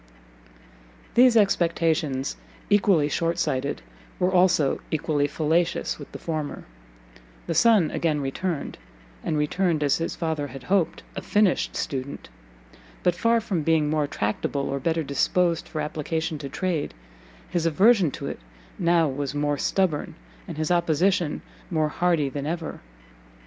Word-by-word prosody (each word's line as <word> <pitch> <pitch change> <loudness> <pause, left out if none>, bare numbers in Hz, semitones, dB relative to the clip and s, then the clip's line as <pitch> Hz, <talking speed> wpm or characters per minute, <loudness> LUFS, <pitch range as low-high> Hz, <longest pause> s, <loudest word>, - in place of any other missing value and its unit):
These 245 -1 +6
expectations, 165 - +1 0.4
equally 195 -7 +4
shortsighted, 150 - -1 0.3
were 185 +1 +1
also 180 -6 +3
equally 150 -2 0
fallacious 165 +3 0
with - - -10
the - - -7
former: 155 -3 -4 0.8
the 170 - -2
son 215 -4 +4
again 155 -3 0
returned, 145 +4 -3 0.4
and 160 -2 -1
returned, 155 +1 +1
as 140 - +3
his 165 - -3
father 160 -3 -2
had 135 -1 -10
hoped, 185 -1 0
a - - -4
finished 205 -3 +1
student; 135 0 -4 0.7
but, 180 - +3
far 230 +7 +2
from 200 -7 -2
being 155 -1 +2
more 150 -2 +1
tractable, 140 +3 -2
or 140 0 -2
better 165 +3 0
disposed 170 +4 +1
for 155 - -4
application 155 +1 -3
to 140 - -6
trade, 170 0 -2 0.5
his 170 -2 0
aversion 190 +2 +4
to - - -7
it - - -5 0.4
now 170 -2 +3
was 140 +1 -3
more 145 0 0
stubborn, 185 -6 0 0.3
and - - -7
his 155 +2 -1
opposition 170 0 +1 0.3
more 155 -3 +1
hardy 170 -2 +1
than 140 +1 -4
ever. 165 0 -4
160 Hz, 135 wpm, -25 LUFS, 145-180 Hz, 0.8 s, These